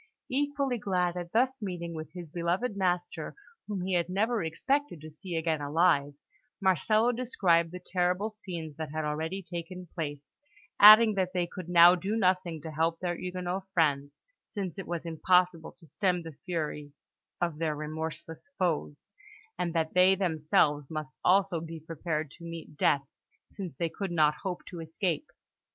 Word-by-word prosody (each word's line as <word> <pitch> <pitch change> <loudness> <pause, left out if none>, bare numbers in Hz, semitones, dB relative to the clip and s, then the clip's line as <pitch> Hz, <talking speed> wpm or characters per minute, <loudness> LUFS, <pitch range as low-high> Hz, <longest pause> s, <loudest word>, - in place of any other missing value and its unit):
Equally 280 -2 0
glad 180 -3 0
at 175 -1 -5
thus 255 +2 +1
meeting 175 -4 -4
with 155 -2 -6
his 175 -4 -8
beloved 180 +7 -1
master, 180 -2 -1 0.3
whom 205 -3 -3
he 190 - -1
had 175 -1 +1
never 215 +3 +1
expected 260 - -1
to 155 0 -9
see 175 +3 -7
again 160 -2 0
alive, 145 -1 +2 0.4
Marcello 215 - +3
described 190 -9 +2
the 180 - -7
terrible 180 +3 0
scenes 170 -8 -7
that 160 -2 -4
had 155 0 -2
already 160 +6 -3
taken 180 +1 -7
place, 145 -4 -6 0.4
adding 215 +1 +10
that 190 -2 -1
they 180 -1 +1
could 175 0 -8
now 175 0 +8
do 190 +4 -2
nothing 185 -5 +1
to 160 - -6
help 165 +2 0
their 175 -1 -2
Huguenot 180 +1 -4
friends, 145 -3 +1 0.3
since 195 -3 -5
it 190 - -6
was 170 -1 -4
impossible 175 0 +2
to 165 - -20
stem 180 +1 0
the 165 -1 -8
fury 150 -5 -3 0.5
of 170 -3 -1
their 160 -2 0
remorseless 160 - -6
foes, 160 -5 -1 0.5
and 175 - 0
that 160 -1 0
they 185 +1 +6
themselves 155 -5 +1
must 155 -4 -5
also 190 -2 +3
be 165 0 -7
prepared 155 -1 -4
to 170 - -15
meet 165 -2 -8
death, 140 -2 +2 0.4
since 185 -7 -7
they 170 - 0
could 195 +2 -4
not 155 -3 +4
hope 180 -2 -4
to 175 - -8
escape. 165 0 -2
175 Hz, 165 wpm, -29 LUFS, 160-190 Hz, 0.5 s, adding